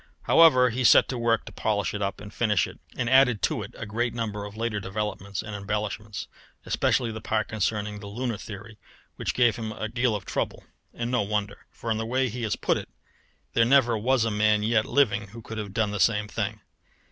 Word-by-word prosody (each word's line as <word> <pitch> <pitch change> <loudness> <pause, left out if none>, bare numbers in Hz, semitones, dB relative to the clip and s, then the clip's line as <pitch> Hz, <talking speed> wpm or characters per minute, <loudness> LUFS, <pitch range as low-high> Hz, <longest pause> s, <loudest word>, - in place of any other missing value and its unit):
However, 130 -7 +6
he 125 +3 -2
set - - +7
to 130 - -2
work 115 -1 +1
to - - -9
polish 105 -4 -1
it 105 - -4
up 100 -1 -2
and 105 0 -10
finish 105 -4 +2
it, - - -11 0.2
and 120 - -1
added 125 -4 +4
to - - +1
it - - -9
a - - -5
great 120 +3 -2
number 105 -3 -3
of 105 +1 -9
later 115 -2 -1
developments 100 0 -4
and 105 -1 -6
embellishments, 105 +1 -4 0.4
especially 120 -3 +1
the 110 0 -7
part 110 0 -1
concerning 105 0 -2
the 100 - -9
lunar 115 +2 -3
theory, 105 +1 -10 0.4
which - - -2
gave 120 -3 +3
him 110 -2 -4
a 110 0 -4
deal 120 0 0
of 100 - -5
trouble - - -3 0.3
and 120 +1 -4
no 125 - +2
wonder; 105 0 -3
for 115 - -5
in 110 - +1
the 110 - -3
way 130 +1 +1
he 120 +3 -6
has 110 -2 0
put - - +1
it - - -7 0.6
there 115 - +4
never 120 -1 +4
was 120 +2 +2
a 115 - 0
man 105 0 +2
yet 110 0 +2
living 105 -7 +2
who 115 +4 -11
could 110 0 -6
have 105 -2 -5
done 105 0 0
the 105 - -3
same 105 +2 +2
thing. 105 0 -3
110 Hz, 220 wpm, -26 LUFS, 105-120 Hz, 0.6 s, set